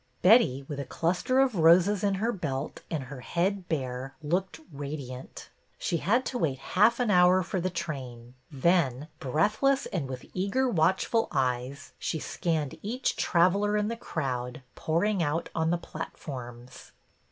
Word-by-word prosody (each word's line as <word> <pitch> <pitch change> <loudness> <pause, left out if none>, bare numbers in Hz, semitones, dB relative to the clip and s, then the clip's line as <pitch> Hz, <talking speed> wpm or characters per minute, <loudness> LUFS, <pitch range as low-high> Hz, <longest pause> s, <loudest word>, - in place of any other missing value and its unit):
Betty, 180 - +5
with 145 -2 -5
a - - -2
cluster 180 - 0
of 270 -2 +4
roses 175 +5 +5
in 200 -1 +2
her 220 +5 0
belt 145 - -4
and 155 -5 -2
her 130 +1 -9
head 180 - -1
bare, 130 -3 -3
looked 175 +2 -1
radiant. 140 -3 -7 0.3
She 170 - -1
had 230 +10 +1
to 250 - -3
wait 145 -6 0
half 210 - +3
an 240 -4 +2
hour 180 0 +5
for 185 +1 -2
the 185 - 0
train. 130 -9 -6 0.2
Then, 150 -2 +1
breathless 215 - +1
and 150 -8 -3
with 130 -1 -6
eager, 200 +8 0
watchful 190 +3 +2
eyes, 130 0 -2
she - - -2
scanned 155 -3 -2
each 245 +6 -1
traveler 200 +4 +2
in 210 0 0
the 230 - -2
crowd 125 - -4
pouring 185 +5 0
out 165 +1 -1
on 160 0 0
the 175 - +2
platforms. 125 -7 -8
165 Hz, 155 wpm, -28 LUFS, 135-195 Hz, 0.3 s, Betty